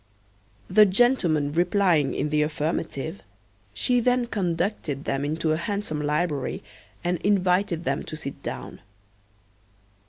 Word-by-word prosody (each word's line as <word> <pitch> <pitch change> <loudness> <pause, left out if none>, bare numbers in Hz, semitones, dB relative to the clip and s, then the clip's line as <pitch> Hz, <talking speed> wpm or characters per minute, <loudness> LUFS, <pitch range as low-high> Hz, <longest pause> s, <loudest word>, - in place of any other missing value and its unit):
The 210 +2 +6
gentlemen 185 - +3
replying 175 -3 +2
in 150 - -1
the 150 0 +2
affirmative, 160 +2 -2 0.5
she 250 -1 +2
then 245 +1 +2
conducted 175 - -2
them 135 +1 -1
into 155 +2 -1
a 155 - +2
handsome 200 -4 -3
library, 150 -2 -1 0.4
and 175 -1 0
invited 185 -3 +1
them 140 -3 -1
to - - -6
sit 140 -2 -7
down. - - -6
170 Hz, 120 wpm, -25 LUFS, 150-200 Hz, 0.5 s, The